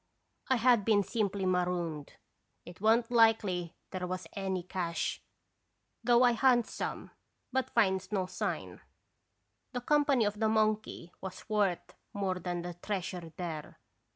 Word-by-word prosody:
1 260 - +3
had 240 -2 +4
been 205 -1 +3
simply 200 -3 -1
marooned. 175 -4 -1 0.5
It 175 +2 -12
wa' 220 +1 +6
n't 235 0 -3
likely 220 -7 +3 0.2
there 185 -1 -3
was 185 -1 -4
any 190 -2 -2
cache, 170 -2 -2 0.8
though 240 +1 +5
I 245 -1 +5
hunts 240 -1 +3
some, - - -4 0.4
but 260 0 0
finds 190 -5 +1
no 190 -3 0
sign. 185 - -4 0.9
The 245 - -2
company 285 -3 +3
of 210 0 -2
the 220 -1 +2
monkey 215 -5 0
was 190 -1 -8
worth 205 -5 0 0.2
more 190 -2 -1
than 175 -1 -3
the 175 0 -5
treasure 180 -2 -4
there. 160 -4 -5
200 Hz, 140 wpm, -31 LUFS, 180-225 Hz, 0.9 s, wa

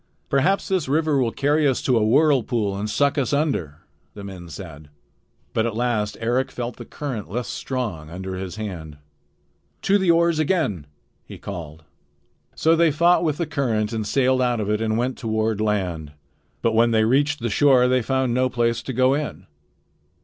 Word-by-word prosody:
"Perhaps 150 +9 +2
this 185 -7 0
river 150 0 +1
will 120 -3 +1
carry 145 +3 +2
us 130 - +1
to 130 - +2
a 110 - +3
whirlpool 120 -5 +2
and 105 +2 -3
suck 140 +7 +1
us 135 0 -1
under," 105 - -1 0.3
the 100 - -8
men 95 -3 -9
said. 80 -4 -10 0.6
But 110 +1 +1
at 115 - -4
last 110 -3 -1
Eric 120 +3 0
felt 120 -1 -5
the 120 - -9
current 125 -10 -6
less 120 +5 -3
strong 105 - -4
under 95 +2 -6
his 95 0 -6
hand. 85 -9 -6 0.9
"To 200 +1 +3
the 190 -2 +1
oars 170 -1 +3
again!" 140 - 0 0.4
he - - -11
called. 80 -5 -8 0.7
So 160 +1 +3
they 165 0 +4
fought 170 +4 +3
with 155 -3 0
the 170 - -1
current 120 -8 -1
and 110 -2 -2
sailed 130 +3 +2
out 120 -2 +1
of 105 -1 -1
it 105 +1 0
and 110 0 0
went 125 +2 -2
on - - -12
toward 110 -1 0
land. 90 -8 -2 0.5
But 115 - +2
when 115 +1 +4
they 110 -1 +3
reached 145 +5 +2
the 120 0 -2
shore 130 +1 +4
they 130 0 +2
found 130 0 0
no 130 +1 +2
place 115 -1 0
to 130 - -5
go 130 +2 +3
in. 140 - -4
120 Hz, 185 wpm, -23 LUFS, 105-140 Hz, 0.9 s, they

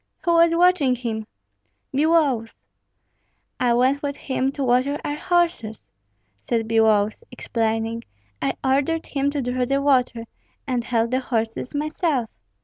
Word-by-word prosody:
"Who 340 - +2
was 335 0 +5
watching 345 -7 +4
him?" 225 -3 -4 0.7
"Biloüs." 285 -7 +2 1.0
"I 245 -2 +2
went 260 +4 +2
with 285 -1 -3
him 265 0 -1
to 280 - -3
water 255 +3 +2
our 290 - -2
horses," 330 - -1 0.6
said 225 -2 0
Biloüs, 220 - +2
explaining. 225 0 -2 0.4
"I - - 0
ordered 285 +5 +1
him 280 -1 -1
to 285 -2 -2
draw 250 +1 -1
the 275 +2 +1
water, 255 -4 +1 0.4
and 250 -4 -1
held 230 -1 0
the 255 - +2
horses 230 +1 -3
myself." 295 -4 -1
255 Hz, 135 wpm, -23 LUFS, 230-290 Hz, 1.0 s, was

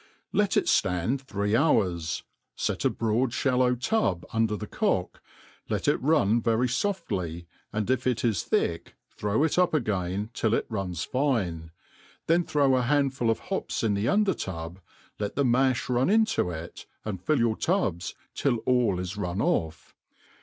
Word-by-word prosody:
Let 205 -2 +2
it - - +3
fland 95 +9 +1
three 105 -5 -1
hours, 90 - +1 0.3
kt - - -2
a - - +5
broad 115 +2 0
(hallow 125 -2 +2
tub 120 - 0
under 110 -2 +1
the - - -5
cock, - - -1 0.5
let - - -1
it - - +2
run 120 -6 +3
very 115 +1 +2
foftiyy 100 - -2 0.3
and 110 -1 -2
If 130 +1 0
It 125 -1 0
is 110 -6 +1
thtck 85 0 -1 0.2
throw 105 +7 0
it 160 +2 +1
up 180 -3 +3
again 105 -4 -1
till 110 0 +1
it - - -1
runs 95 -6 -3
fine, 100 - -1 0.6
(heif 170 +1 +3
throw 140 -3 +3
a - - +2
handful 135 -2 +1
of 115 - +2 0.2
hops - - -2
in 110 -2 +2
^he 100 +4 +1
under 205 -2 +3
tuW, 85 -1 -6 0.4
let 105 -1 -3
the 140 - +2
ma(b 130 +1 +2
run 125 +3 +2
into 220 - +2
it, 85 0 -8 0.2
and 100 -5 -4
fill 155 +9 +1
your 115 -2 +2
tub's 110 - -1 0.2
till 135 -4 +1
all 125 -7 +2
is 90 +2 -5
run 90 -1 -3
off. 80 - -1
115 Hz, 165 wpm, -27 LUFS, 95-135 Hz, 0.6 s, a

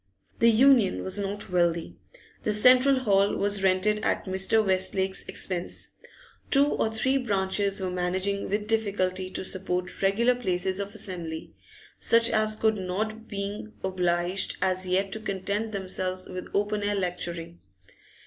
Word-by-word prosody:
The 230 - +6
Union 235 -3 +4
was 190 +2 -1
not 200 -1 -4
wealthy. 170 -2 0 0.5
The 210 - -1
central 255 +4 +6
hall 200 -4 +3
was 200 0 +1
rented 195 +3 +2
at - - 0
Mr. 190 +3 +2
Westlake's 190 0 0
expense; 180 -2 -3 0.6
two 280 0 +5
or 225 -6 0
three 260 +5 +1
branches 200 -3 0
were 185 -1 -2
managing 185 +2 -2
with 210 +1 -1
difficulty 190 -4 -1
to 190 - -5
support 180 -1 -2
regular 215 +6 +3
places 190 -5 -2
of 200 0 -5
assembly, 165 -4 -5 0.5
such 230 +1 +3
as 215 -1 +2
could 220 0 +1
not 215 +4 -4
being 205 +1 -5
obliged 180 0 0
as 185 0 0
yet 190 +2 0
to 220 - -3
content 205 +1 -3
themselves 185 -2 -3
with 185 0 -7
open 205 +1 0
air 205 0 0
lecturing. 175 - -4
195 Hz, 140 wpm, -27 LUFS, 185-215 Hz, 0.6 s, The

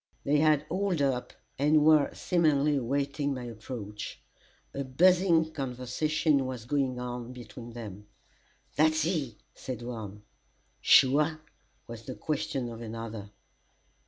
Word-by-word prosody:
They 145 +1 +2
had 155 -1 +4
hauled 185 +1 -1
up, 125 -3 0 0.3
and 150 +1 +4
were 155 -2 +5
seemingly 150 -4 +2
awaiting 140 +2 -1
my 125 - -6
approach. 110 -2 -7 0.5
A 140 - -3
buzzing 165 +3 +3
conversation 135 +2 0
was 125 -3 -6
going 130 -2 0
on 125 0 -5 0.2
among 120 -2 -9
them. 105 -3 -8 0.7
"That's 155 0 +3
he!" 150 - -1 0.2
said 125 -2 -6
one. 105 -4 -7 0.6
"Sure?" 145 +4 +5 0.5
was 115 -1 -8
the 130 - -6
question 140 -4 -2
of 115 0 -8
another. 115 -2 -6
135 Hz, 120 wpm, -29 LUFS, 120-150 Hz, 0.7 s, were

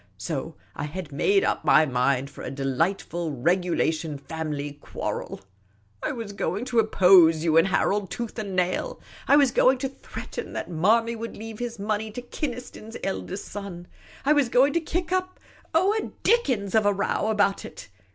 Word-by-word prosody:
So - - -4 0.2
I 145 - -3
had 160 +1 -6
made 195 +8 +2
up - - 0
my 155 +3 +6
mind 130 0 0
for - - -11
a - - -4
delightful 165 +5 -1
regulation 165 0 0
family 150 -1 -4
quarrel. - - -5 0.6
I - - -1
was 225 -5 -6
going 200 +4 -2
to 245 -2 +1
oppose 180 -7 +6
you 160 -2 +2
and 165 +3 +6
Harold, 195 +2 +1
tooth 235 +2 -5
and 200 -3 -4
nail; 185 - -1 0.3
I - - +6
was 280 -4 +5
going 260 +2 +4
to 265 +1 -2
threaten 275 - -8
that - - -5
Manny 225 +8 +2
would 230 +1 -6
leave 220 0 -8
his 240 -1 -4
money 210 +1 -2
to 245 - -5
Kynaston's 245 -4 -6
eldest 195 0 -4
son; 195 -4 -7 0.4
I 295 - +5
was 285 -5 +2
going 265 +4 +4
to 335 - +1
kick 345 +2 -3
up, 370 0 -1 0.3
oh, 375 +6 +3
a 440 - -2
dickens 255 - +2
of 220 -2 +4
a 205 - +4
row 200 +2 -1
about 205 -2 +2
it - - -10
200 Hz, 175 wpm, -25 LUFS, 165-240 Hz, 0.6 s, my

